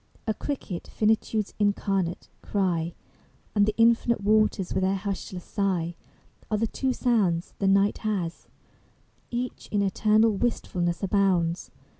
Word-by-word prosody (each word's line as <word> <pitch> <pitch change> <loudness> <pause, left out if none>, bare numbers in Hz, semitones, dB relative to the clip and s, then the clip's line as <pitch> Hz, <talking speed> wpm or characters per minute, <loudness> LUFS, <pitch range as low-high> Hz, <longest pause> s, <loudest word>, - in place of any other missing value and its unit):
A 220 - +1
cricket, 215 -9 -5
finitude's 215 -1 0
incarnate 195 -3 0
cry, 175 -4 -1 0.6
And 205 -1 +3
the 215 - 0
infinite 230 0 +3
waters 215 -2 +2
with - - 0
their 190 +1 +2
hushless 190 -2 -5
sigh 180 -5 -1 0.5
Are 215 - +1
the 225 - +1
two 260 +4 -1
sounds 205 -10 +1
The 195 - +1
night 195 +1 +3
has: 190 -6 -3 0.8
Each 245 +1 -4
in 205 -1 +2
eternal 215 +3 +3
wistfulness 180 -6 -1
abounds. 185 -4 +1
200 Hz, 125 wpm, -26 LUFS, 185-220 Hz, 0.8 s, And